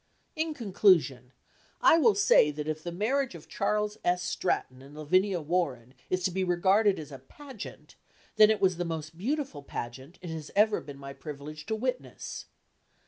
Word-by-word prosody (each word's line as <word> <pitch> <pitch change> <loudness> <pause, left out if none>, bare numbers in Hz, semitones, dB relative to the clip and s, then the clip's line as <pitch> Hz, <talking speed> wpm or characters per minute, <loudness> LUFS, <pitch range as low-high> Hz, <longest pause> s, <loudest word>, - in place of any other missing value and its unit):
In 315 -1 -2
conclusion, 180 - +2 0.5
I 330 - +6
will 230 -9 +5
say 195 -6 +5
that 150 0 -5
if 155 0 -3
the 175 - -5
marriage 240 +7 0
of 160 - -12
Charles 210 0 -1
S. 180 0 +1
Stratton 130 -7 -2
and 140 +2 -14
Lavinia 185 +4 +1
Warren 145 -7 -2 0.2
is 185 0 0
to 185 - +1
be 190 +2 -1
regarded 190 +3 +3
as 150 -2 -8
a 135 - -8
pageant, 260 - -11 0.4
then 215 0 +7
it 220 - +2
was 185 -3 +2
the 175 - -1
most 160 -2 -5
beautiful 245 - -3
pageant 130 +4 -7
it 175 - -5
has 160 -2 -6
ever 210 +1 +3
been 145 -2 -10
my 140 0 -8
privilege 150 +1 -9
to 220 - 0
witness. 250 +3 -4
175 Hz, 175 wpm, -29 LUFS, 150-210 Hz, 0.5 s, then